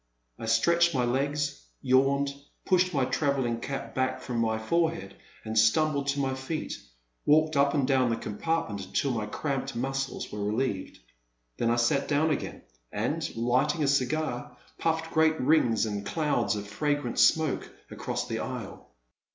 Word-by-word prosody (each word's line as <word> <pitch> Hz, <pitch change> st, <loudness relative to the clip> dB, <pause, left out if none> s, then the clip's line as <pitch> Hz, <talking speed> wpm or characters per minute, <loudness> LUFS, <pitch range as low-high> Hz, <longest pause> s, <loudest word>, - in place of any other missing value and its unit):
I 115 Hz, -, -5 dB
stretched 170 Hz, +9 st, +3 dB
my 125 Hz, -2 st, +2 dB
legs, 145 Hz, +3 st, -1 dB, 0.2 s
yawned, 135 Hz, +2 st, +3 dB, 0.3 s
pushed 185 Hz, -1 st, +3 dB
my 135 Hz, -6 st, +1 dB
travelling 130 Hz, -5 st, 0 dB
cap 135 Hz, +2 st, -5 dB
back 130 Hz, 0 st, 0 dB
from 120 Hz, -2 st, -3 dB
my 110 Hz, -1 st, +1 dB
forehead, 110 Hz, -, -1 dB, 0.3 s
and 110 Hz, 0 st, -4 dB
stumbling 140 Hz, +6 st, +3 dB
to 140 Hz, 0 st, 0 dB
my 135 Hz, -1 st, 0 dB
feet, 130 Hz, +4 st, -4 dB, 0.4 s
walked 155 Hz, +1 st, +4 dB
up 140 Hz, +1 st, +3 dB
and 140 Hz, -3 st, +2 dB
down 130 Hz, -3 st, +3 dB
the 115 Hz, -, +1 dB
compartment 110 Hz, -, -2 dB
until 100 Hz, +9 st, -1 dB
my 110 Hz, -3 st, -2 dB
cramped 135 Hz, +2 st, -3 dB
muscles 135 Hz, +2 st, -3 dB
were 105 Hz, -1 st, -4 dB
relieved. 105 Hz, -1 st, -2 dB, 0.6 s
Then 115 Hz, -, +1 dB
I 120 Hz, -, +3 dB
sat 120 Hz, +4 st, +2 dB
down 150 Hz, +2 st, +2 dB
again, 145 Hz, -, -3 dB, 0.3 s
and, 150 Hz, +9 st, -1 dB
lighting 125 Hz, +7 st, +1 dB
a -, -, +2 dB
cigar, 130 Hz, -2 st, -1 dB, 0.2 s
pufied 160 Hz, 0 st, -1 dB
great 160 Hz, 0 st, +3 dB
rings 125 Hz, -6 st, +3 dB
and 105 Hz, -2 st, -3 dB
clouds 150 Hz, -6 st, 0 dB
of 105 Hz, 0 st, -4 dB
fragrant 145 Hz, +7 st, -1 dB
smoke 160 Hz, -3 st, +3 dB, 0.2 s
across -, -, -3 dB
the -, -, -3 dB
aisle. -, -, -6 dB
135 Hz, 155 wpm, -28 LUFS, 115-150 Hz, 0.6 s, walked